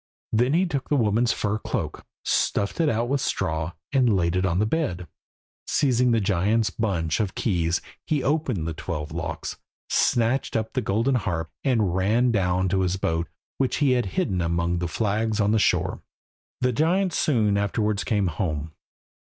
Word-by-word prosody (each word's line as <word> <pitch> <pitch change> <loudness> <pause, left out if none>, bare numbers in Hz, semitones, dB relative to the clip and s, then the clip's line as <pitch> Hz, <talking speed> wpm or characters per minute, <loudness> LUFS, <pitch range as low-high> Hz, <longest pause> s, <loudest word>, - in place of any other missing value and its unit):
Then 120 +5 +3
he 180 +3 +3
took 140 -7 -3
the 150 - +3
woman's 115 -1 +2
fur 105 +1 -1
cloak, - - -4 0.2
stuffed 100 - 0
it 160 -2 +3
out 115 0 0
with 140 +1 0
straw, 80 +2 -1 0.2
and 125 -7 +4
laid 85 -1 +1
it 90 +1 +1
on 85 -1 0
the 105 - +2
bed. 110 - -1 0.6
Seizing 125 -4 +2
the 115 -1 +3
giant's 105 +3 +1
bunch 85 -8 -1
of 100 -4 -1
keys, 85 -6 0 0.3
he 145 -4 0
opened 135 - 0
the 80 - -2
twelve 75 -2 -5
locks, - - -4 0.3
snatched 120 +3 +2
up 110 0 -1
the 130 - 0
golden 115 +5 +1
harp, 85 -9 -1
and 110 -9 +2
ran 110 +6 +2
down 95 -3 +1
to 95 +1 +1
his 95 0 0
boat, 85 -2 -1 0.3
which 135 -2 +1
he 145 -3 +2
had 125 -5 +1
hidden 95 - +1
among 85 +1 0
the 85 - -1
flags 110 +4 -1
on 105 0 +3
the 110 - +3
shore. - - +1 0.6
The 125 0 +2
giant 175 - +2
soon 110 -11 +2
afterwards 105 +1 0
came 105 -5 +1
home. 80 -3 -2
105 Hz, 175 wpm, -25 LUFS, 90-125 Hz, 0.6 s, and